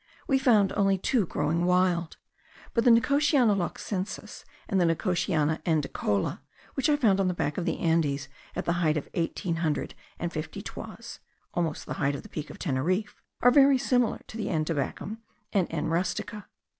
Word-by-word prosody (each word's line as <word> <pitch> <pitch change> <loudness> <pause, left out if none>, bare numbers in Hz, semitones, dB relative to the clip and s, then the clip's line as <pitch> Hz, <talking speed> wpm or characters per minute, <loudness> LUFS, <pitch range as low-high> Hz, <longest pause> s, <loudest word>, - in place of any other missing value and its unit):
we 270 -1 +3
found 215 -7 +4
only 195 -2 +2
two 205 +1 +1
growing 160 +4 0
wild; 180 -2 +2 0.6
but 230 - +2
the 245 - +5
Nicotiana 270 0 +4
loxensis, 190 +1 -4 0.2
and 195 -4 +1
the - - +4
Nicotiana 165 -2 +1
andicola, 140 - 0 0.3
which 270 +3 +1
I 295 - +5
found 220 -9 +3
on 195 - +2
the 180 - 0
back 150 -2 -1
of 175 - -3
the - - -1
Andes, 150 -4 +1 0.3
at - - -3
the 170 - +2
height 155 -2 +2
of 145 - -4
eighteen 170 0 -1
hundred 160 -3 -1 0.2
and - - -3
fifty - - -5
toises - - -8 0.3
(almost 165 -3 -2
the - - -4
height 140 0 +2
of 140 - -7
the - - -12
Peak 155 -1 -6
of - - -9
Teneriffe), 180 +8 -1 0.2
are 245 - +7
very 275 0 +6
similar 245 -2 +1
to 220 - -9
the 220 - -2
N. 155 -4 0
tabacum 165 +8 -3 0.3
and 195 -4 +2
N. 155 -2 -2
rustica. 185 +5 -2
180 Hz, 180 wpm, -28 LUFS, 160-220 Hz, 0.6 s, are